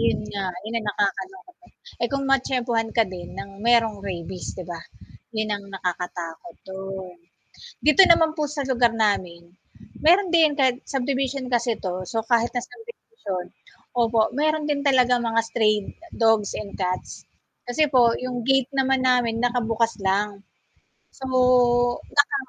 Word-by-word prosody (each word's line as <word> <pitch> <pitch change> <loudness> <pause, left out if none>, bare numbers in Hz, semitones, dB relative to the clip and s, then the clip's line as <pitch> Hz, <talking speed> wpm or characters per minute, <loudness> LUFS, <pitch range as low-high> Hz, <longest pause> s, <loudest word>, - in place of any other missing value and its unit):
'Yon 230 - +1
nga 200 -1 -3 0.2
'yon 225 +2 -4
ang 215 - -7
nakakalungkot. 360 - -3 0.5
Eh, - - +3
kung 275 0 -1
matiyempuhan 245 -4 +1
ka 225 - +5
din 175 -1 -7
ng 200 - -7 0.2
merong 225 -3 +4
rabies 180 0 -6
'di 185 - -8
ba? 170 - -5 0.6
Yun 215 0 -1
ang 200 -1 -3
nakakatakot 180 +2 -5
dun. 190 -1 -7 0.7
Dito 305 +6 +7
naman 325 -2 +5
po 305 - 0
sa 285 - -1
lugar 240 -2 +3
namin, 180 -4 -1 0.6
meron 360 +3 +5
din 315 -3 +5
kahit 255 -2 +3
subdivision 270 0 -1
kasi 240 0 +2
'to 185 -2 -3 0.2
so 225 - -3
kahit 235 0 +3
na 245 - -1
subdivision 445 - -8 0.6
opo, 225 -1 +3 0.2
meron 310 0 +1
din 285 -1 0
talagang 250 -2 +4
mga 230 0 +2
stray 215 -2 +3 0.4
dogs 225 -3 +2
and 200 -2 -9
cats. 185 -1 -2 0.6
Kasi 245 +6 +1
po 235 -2 +5
yung 245 -2 -4
gate 270 -1 +3
naman 265 -1 +2
namin 240 -3 +2
nakabukas 230 -2 0
lang. 200 +1 0 0.6
So, 265 - -10 0.8
naka 285 0 +2
235 Hz, 145 wpm, -23 LUFS, 200-270 Hz, 0.8 s, Dito